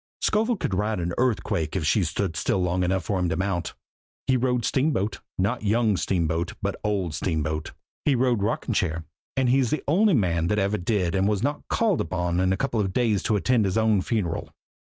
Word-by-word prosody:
"Scovel 220 +2 +1
could 105 - -2
ride 105 +2 0
an 85 0 -2
earthquake 90 - 0
if 90 -5 -1
she 90 +6 +3
stood 85 +2 -2
still 80 - 0
long 90 0 0
enough 95 +1 0
for 100 -4 -1
him 90 -1 0
to 80 - 0
mount! 95 -2 -2 0.5
He 130 - +2
rode 125 -2 +1
Steamboat 130 -8 0 0.2
not 100 +6 0
Young 110 0 +2
Steamboat, 85 -2 -1
but - - -2
Old 100 -6 -1
Steamboat! 80 -1 -2 0.3
He 145 - +3
rode 120 -3 +2
Rocking 105 +3 -1
Chair, 80 -4 -1 0.3
and 130 -1 +2
he's 130 -1 +3
the 155 - -1
only 190 +5 +4
man 85 -7 +1
that 105 - +1
ever 100 +1 +1
did 90 -2 0
that 95 - +1
and 95 - +2
was 105 0 0
not 145 +2 -2
called 205 - +1
on 90 -1 0
in 95 0 +2
a 95 - +1
couple 120 -3 -1
of 95 -3 -1
days 110 -4 +2
to 110 - +1
attend 115 +2 +2
his 95 +2 0
own 110 -3 +3
funeral." 95 -5 -2
100 Hz, 210 wpm, -25 LUFS, 90-120 Hz, 0.5 s, only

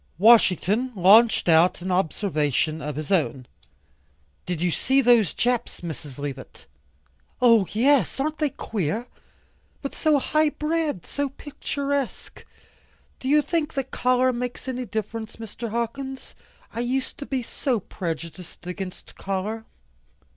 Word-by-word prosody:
Washington 220 +3 +4
launched 210 +5 +6
out 165 +2 +5
an 185 - -2
observation 160 - 0
of 150 -1 -4
his 155 +2 -5
own. 145 -8 +1 1.0
"Did 175 -3 -2
you 175 +1 +1
see 265 - +2
those 240 -6 +5
Japs, 245 -6 -1
Miss 150 -5 -7
Leavitt?" 140 -2 -7 0.7
"Oh, 230 -6 +5
yes, 265 +6 +3
aren't 305 +2 -1
they 300 -2 +2
queer. 215 - -3 0.8
But 275 - -4
so 310 -2 +3
high 305 +3 +2
bred, 305 - -2
so 285 -1 -2
picturesque. 280 -1 -4 0.7
Do 260 - -3
you 300 +1 +5
think 320 -2 -1
that 270 -1 -3
color 255 +1 +2
makes 245 +1 -5
any 255 -1 -3
difference, 220 +2 -4
Mr. 230 +1 -7
Hawkins? 260 +4 -4 0.4
I 230 - -4
used 255 +2 -2
to 280 - -6
be 260 -2 -2
so 245 0 -1
prejudiced 170 -1 -7
against 185 0 -7
color." 200 +4 -3
230 Hz, 130 wpm, -24 LUFS, 180-265 Hz, 1.0 s, launched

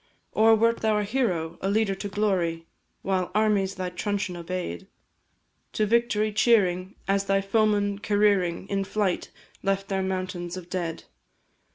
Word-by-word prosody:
Or 225 +1 +5
wert 230 +1 +3
thou 220 -1 +2
a 210 - +1
hero, 195 -8 -1
a 195 - 0
leader 210 -1 +2
to 195 +1 -5
glory, 185 -5 0 0.4
While 185 -2 0
armies 205 -3 +2
thy 185 -1 -4
truncheon 200 0 -2
obey'd; 170 - -5 0.9
To 215 - +1
victory 215 -1 +1
cheering, 195 -4 +2
as 195 0 +1
thy 195 0 +2
foemen 205 0 +1
careering 205 -4 +1
In 195 -1 -1
flight, 195 -2 -1 0.3
left 195 0 -1
their 195 -1 0
mountains 185 -2 -3
of 180 -1 -10
dead? 170 -3 -3
195 Hz, 145 wpm, -26 LUFS, 185-210 Hz, 0.9 s, Or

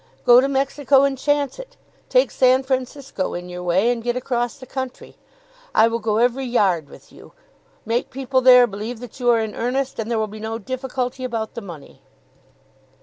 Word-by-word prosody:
Go 245 +1 +8
to 270 - +1
Mexico, 275 0 +2
and 275 -1 +1
chance 285 - -1
it. - - -11 0.3
Take - - +3
San 255 0 +3
Francisco 260 -4 -3
in 180 +1 -7
your 180 0 -7
way, 185 +6 +2
and 240 -1 -3
get 240 +1 -2
across 245 0 -2
the 265 - -11
country. 260 0 -7 0.6
I 225 - +6
will 230 0 -2
go 215 -1 -1
every 245 +3 +1
yard 190 - +1
with - - -16
you. - - -16 0.5
Make 230 +2 -1
people 265 0 -1
there 250 -1 +8
believe 220 +2 -6
that 245 +1 -11
you 245 -1 +1
are 235 -1 +4
in 220 -1 -3
earnest, 260 +2 -2
and 225 0 -3
there 235 - 0
will 220 - +1
be 215 +1 -10
no 220 +1 -4
difficulty 255 +2 -4
about 225 -3 -3
the 235 - -6
money." 170 -8 -12
245 Hz, 195 wpm, -21 LUFS, 220-265 Hz, 0.6 s, Go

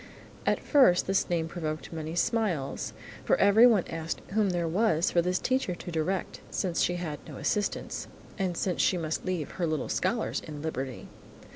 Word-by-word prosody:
At - - +3
first 255 - +5
this 195 0 +1
name 165 -2 0
provoked 155 -1 -4
many 160 0 -4
smiles, 175 -8 0 0.3
for - - +3
everyone 210 0 +6
asked 165 0 -4
whom 210 0 +2
there 175 -2 0
was 180 -1 +2
for 170 - +4
this 180 +1 0
teacher 255 -7 0
to 175 - -8
direct, 175 +4 -2
since 180 -3 -1
she 175 - +2
had 160 -4 -4
no - - -8
assistants, 205 -1 -2 0.3
and 185 -4 -1
since 185 -2 0
she 185 - +3
must 160 -2 -3
leave 180 -6 -2
her 175 -2 -1
little 155 -1 -2
scholars 230 -1 0
in 150 -2 -7
liberty. 135 -5 -4
175 Hz, 170 wpm, -29 LUFS, 160-195 Hz, 0.3 s, everyone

